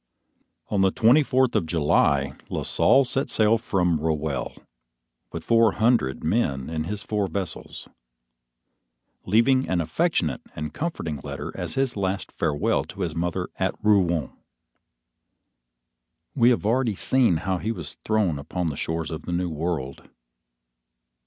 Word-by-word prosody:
On 100 -2 +1
the 95 - +5
twenty 115 +9 +4
fourth 130 -3 +1
of 80 - +1
July, 70 -4 +2 0.2
La - - -3
Salle 135 - +4
set 135 +2 -1
sail 110 +1 +4
from 90 -7 0
Roehelle, 75 -2 -2 0.8
with - - -6
four 115 -2 +4
hundred 110 - +1
men 70 - 0
in 80 -1 -2
his 100 +3 -4
four 105 -2 -1
vessels, 90 -2 -5 1.4
leaving 125 +6 +3
an 90 - +1
affectionate 85 - 0
and 75 0 -5
comforting 115 - -3
letter 65 - -6
as - - -4
his 135 -2 0
last 95 -1 -2
farewell 75 -3 0
to 100 - -9
his 85 -4 -2
mother 85 0 -2
at - - -1
Rouen. 90 -9 +2 2.0
We 120 - +4
have 120 -4 +1
already 115 -1 +1
seen 120 -5 +2
how 95 +2 -2
he 110 - -2
was 90 -9 -7
thrown 105 -9 +1
upon 85 +4 -3
the 70 - -6
shores 80 +1 -3
of 80 0 -7
the - - -3
New 90 0 -1
World. 75 -4 -4
90 Hz, 140 wpm, -24 LUFS, 80-115 Hz, 2.0 s, the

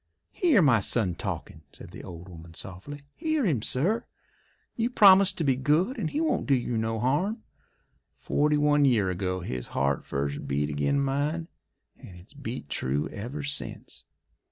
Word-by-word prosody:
"Hear 310 - +4
my 125 -6 +5
son 100 -3 0
talkin'," 80 - -5
said - - -13
the - - -10
old 90 -1 -9
woman 85 -2 -12
softly. 100 +13 -8
"Hear 315 -4 0
him, 145 - +1
sir. 170 - +1 0.7
You 230 +1 0
promise 200 -4 +7
to 165 - -3
be 135 -3 +3
good 155 - +1
and - - -1
he 295 - -2
won't 315 -5 0
do 140 - +4
you 120 -1 -2
no 110 0 -1
harm. 180 - 0 0.7
Forty 150 0 +1
one 145 0 +3
year 110 -9 +3
ago 95 0 -2
his 65 -8 -5
heart 70 +1 +1
first 70 +1 -3
beat 75 +2 -1
ag'in' 75 - +1
mine, 145 +4 -1 0.5
and 90 - -12
it's 90 +9 -17
beat 130 - -6
true 70 +2 -2
ever 125 +8 -6
since." 145 0 -5
130 Hz, 165 wpm, -27 LUFS, -, 0.7 s, promise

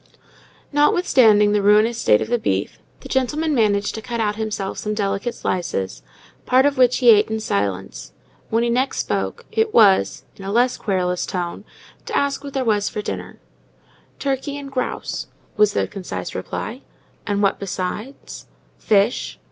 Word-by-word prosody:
Notwithstanding 255 - +4
the 210 0 +2
ruinous 215 +3 +4
state 105 - +4
of - - -2
the 240 0 0
beef, 95 - -2 0.2
the - - -9
gentleman 295 +4 0
managed 205 -5 +1
to 220 - -6
cut 225 -3 -2
himself 215 -3 -3
some 210 0 -3
delicate 200 +3 -2
slices, 95 - -3 0.5
part 260 +2 +4
of 285 -1 +2
which 255 -2 +4
he 245 -3 +6
ate 210 0 +4
in 220 0 -2
silence. 95 - -3 0.4
When 225 +1 +1
he 240 - +1
next 260 +3 0
spoke, - - -2
it 445 -1 0
was, 190 - +4
in 195 - -10
a 195 - -4
less 245 +3 +2
querulous 180 -3 -1
tone, 180 +1 -4 0.4
to - - -1
ask 280 0 0
what 280 -1 -8
there 265 -2 -1
was 210 -2 +1
for 210 - -5
dinner. - - -6 0.8
"Turkey 280 +1 -2
and 280 -1 -8
grouse," 255 -2 -3 0.3
was 210 -2 +3
the - - 0
concise 195 -3 -6
reply. - - -5 0.5
"And 205 -1 0
what 195 - +2
besides?" 200 +7 -6 0.3
"Fish." 210 +3 +1
215 Hz, 160 wpm, -21 LUFS, 195-255 Hz, 0.8 s, he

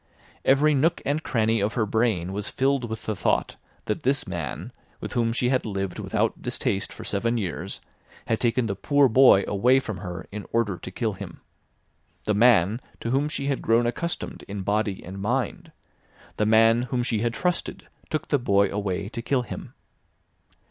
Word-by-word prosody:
Every 145 +3 +4
nook 160 +5 +2
and 145 +3 0
cranny 115 -5 +1
of 105 +2 -1
her 115 -4 +2
brain 105 -5 0
was 105 +1 -3
filled 135 -2 0
with 110 -1 -6
the 110 - -1
thought - - 0 0.3
that 105 - -2
this 135 +2 +1
man, 85 - -5 0.3
with - - -6
whom 115 -2 +1
she 125 +1 +1
had 130 -1 +2
lived 95 -3 -3
without - - -1
distaste 95 - -2
for - - -9
seven 115 +4 0
years, 95 -6 -4 0.4
had 110 - 0
taken 120 0 +1
the 100 -3 -2
"poor 145 +7 +3
boy" 125 -5 +6
away 125 +6 +4
from 110 -6 -5
her 90 -1 -6
in 105 0 -7
order 115 -5 +1
to - - -7
kill 110 +3 -2
him—the 105 +2 -9
man 105 -1 +4 0.2
to 115 - -3
whom 140 +3 +1
she 140 - -3
had 140 -2 -1
grown 115 +1 +3
accustomed 170 +8 -3
in 100 -1 -5
body 105 0 -1
and 95 +2 -7
mind; 135 - -2 0.7
the 105 - +1
man 115 +1 +5
whom 120 0 0
she 115 -3 0
had 120 +1 -1
trusted, 180 -1 -2 0.2
took 155 -1 -3
the 145 - +3
boy 100 -4 +3
away 100 -1 -2
to 115 - -5
kill 125 +1 0
him! 115 - -8
115 Hz, 180 wpm, -25 LUFS, 100-130 Hz, 0.7 s, boy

